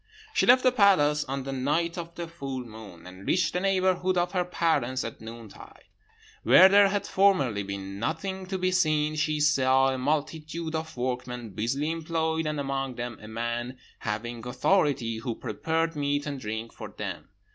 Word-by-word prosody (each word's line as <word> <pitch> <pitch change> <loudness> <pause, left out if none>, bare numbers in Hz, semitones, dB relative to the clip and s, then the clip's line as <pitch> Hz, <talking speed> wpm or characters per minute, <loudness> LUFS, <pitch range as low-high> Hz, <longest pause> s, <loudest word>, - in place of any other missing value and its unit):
"She 445 - +2
left 255 +1 +7
the 255 - +5
palace 155 -10 +4
on 135 0 -4
the 135 - -5
night 150 +6 0
of 170 -1 -7
the 170 -1 -5
full 135 -6 -6
moon, 110 -7 -12
and 95 +2 -11
reached 185 - +2
the 180 - 0
neighbourhood 185 -1 +1
of 175 0 +1
her 180 -2 +1
parents 160 -8 0
at 115 - -7
noontide. 115 -1 -11 0.6
Where 185 - +8
there 200 +1 +6
had 200 +1 -1
formerly 180 - +2
been 100 0 -6
nothing 185 - -3
to 190 0 -2
be 185 0 0
seen 155 -4 +2
she 155 0 0
saw 135 -3 +4
a 130 - -4
multitude 155 +3 -2
of 160 -3 -4
workmen 125 -2 -3
busily 135 - -1
employed, 160 -1 -1
and 150 -1 -2
among 135 -2 -2
them 120 -1 -5
a 110 - -10
man 120 +3 -4 0.2
having 115 +2 -4
authority, 130 - +1
who 115 0 -4
prepared 165 0 -2
meat 145 0 -1
and 145 -2 -4
drink 110 0 -5
for - - -8
them. - - -7
145 Hz, 175 wpm, -27 LUFS, 120-170 Hz, 0.6 s, Where